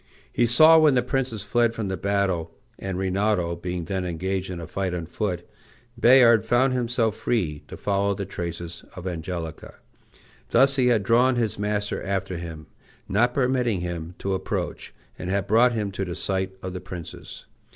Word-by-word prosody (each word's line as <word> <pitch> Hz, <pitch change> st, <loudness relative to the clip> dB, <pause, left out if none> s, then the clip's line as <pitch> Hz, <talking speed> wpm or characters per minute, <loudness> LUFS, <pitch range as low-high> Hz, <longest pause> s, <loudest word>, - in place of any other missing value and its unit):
He 120 Hz, -, +3 dB
saw 155 Hz, +7 st, +7 dB
when 150 Hz, -4 st, +5 dB
the 125 Hz, -, +3 dB
princess 125 Hz, -5 st, -2 dB
fled 115 Hz, +2 st, +1 dB
from 110 Hz, -3 st, -3 dB
the 95 Hz, -, -2 dB
battle, 95 Hz, -4 st, -1 dB, 0.2 s
and 95 Hz, -2 st, -4 dB
Rinaldo 95 Hz, -2 st, 0 dB
being 90 Hz, 0 st, -4 dB
then 95 Hz, 0 st, -2 dB
engaged 95 Hz, +2 st, -2 dB
in 90 Hz, -2 st, -5 dB
a 85 Hz, -, -6 dB
fight 95 Hz, +2 st, -3 dB
on 85 Hz, -2 st, -4 dB
foot, 90 Hz, 0 st, -3 dB, 0.5 s
Bayard 120 Hz, -3 st, +6 dB
found 130 Hz, +2 st, +2 dB
himself 120 Hz, -3 st, 0 dB
free 85 Hz, -14 st, -1 dB
to -, -, -9 dB
follow 100 Hz, 0 st, 0 dB
the 100 Hz, 0 st, -4 dB
traces 85 Hz, -2 st, -6 dB
of 90 Hz, -, -8 dB
Angelica. 85 Hz, -2 st, -5 dB, 0.7 s
Thus 135 Hz, 0 st, +4 dB
he 130 Hz, -2 st, +3 dB
had 115 Hz, -5 st, +3 dB
drawn 125 Hz, +5 st, +4 dB
his 115 Hz, -4 st, -1 dB
master 105 Hz, 0 st, -1 dB
after 95 Hz, -2 st, -2 dB
him, 80 Hz, -2 st, -7 dB, 0.4 s
not 120 Hz, +5 st, +2 dB
permitting 125 Hz, -7 st, +1 dB
him 85 Hz, -1 st, -5 dB
to 95 Hz, -, -2 dB
approach, 95 Hz, -, -3 dB, 0.3 s
and 90 Hz, -, -4 dB
had 100 Hz, 0 st, 0 dB
brought 115 Hz, +4 st, +4 dB
him 105 Hz, -3 st, -2 dB
to 95 Hz, 0 st, -3 dB
the 90 Hz, -2 st, -4 dB
sight 95 Hz, -1 st, -2 dB
of 95 Hz, 0 st, -4 dB
the 90 Hz, -, -5 dB
princess. 90 Hz, -3 st, -9 dB
100 Hz, 175 wpm, -25 LUFS, 90-115 Hz, 0.7 s, saw